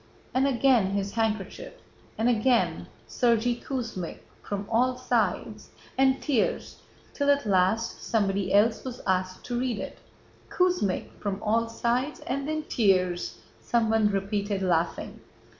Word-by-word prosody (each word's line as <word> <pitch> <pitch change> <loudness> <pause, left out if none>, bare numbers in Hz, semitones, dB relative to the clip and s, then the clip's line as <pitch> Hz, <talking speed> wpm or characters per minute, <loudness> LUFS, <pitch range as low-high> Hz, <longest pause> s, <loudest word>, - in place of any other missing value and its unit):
And 265 +2 +3
again 245 -7 +3
his 200 0 -1
handkerchief, 225 - -2 0.4
and 225 - +1
again: 240 +1 +2 0.2
'Sergéy 240 -1 +1
Kuzmích, 230 -10 -4 0.2
From 200 0 -4
all 250 +2 +2
sides,'... 250 -3 -1 0.3
and 265 0 +3
tears, 270 -8 -1 0.3
till 285 -1 0
at 285 -3 +3
last 200 +4 +1
somebody 200 -3 0
else 220 +2 +3
was 250 -2 -6
asked 185 0 -1
to 240 -1 -2
read 250 -3 -1
it." 195 - -7 0.5
"Kuzmích... 360 - +1
From 200 -1 -3
all 230 +2 +1
sides... 245 +5 -1
and 275 +2 -3
then 310 0 -2
tears," 185 - +1 0.2
someone 225 -2 +2
repeated 200 0 -1
laughing. 170 -2 -1
225 Hz, 125 wpm, -27 LUFS, 200-255 Hz, 0.5 s, And